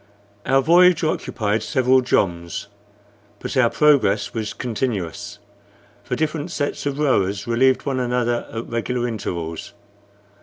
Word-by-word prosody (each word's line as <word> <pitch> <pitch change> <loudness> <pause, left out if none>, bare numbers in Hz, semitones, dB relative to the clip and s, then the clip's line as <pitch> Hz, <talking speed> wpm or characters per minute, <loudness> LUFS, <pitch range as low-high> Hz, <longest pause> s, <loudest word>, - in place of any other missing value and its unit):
Our 135 0 +3
voyage 175 +2 +5
occupied 110 -8 -1
several 130 +3 +2
joms; 85 -6 -1 0.7
but - - -6
our 130 -3 +4
progress 115 -4 +2
was 110 -2 -3
continuous, 110 -8 -4 0.7
for - - -3
different 155 -1 -2
sets 145 0 -3
of 140 -1 -2
rowers 100 -9 +1
relieved 130 +3 +2
one 135 -2 -1
another 120 -1 -1
at 115 +1 -5
regular 120 +1 -2
intervals. 85 -8 -5
120 Hz, 120 wpm, -21 LUFS, 105-135 Hz, 0.7 s, voyage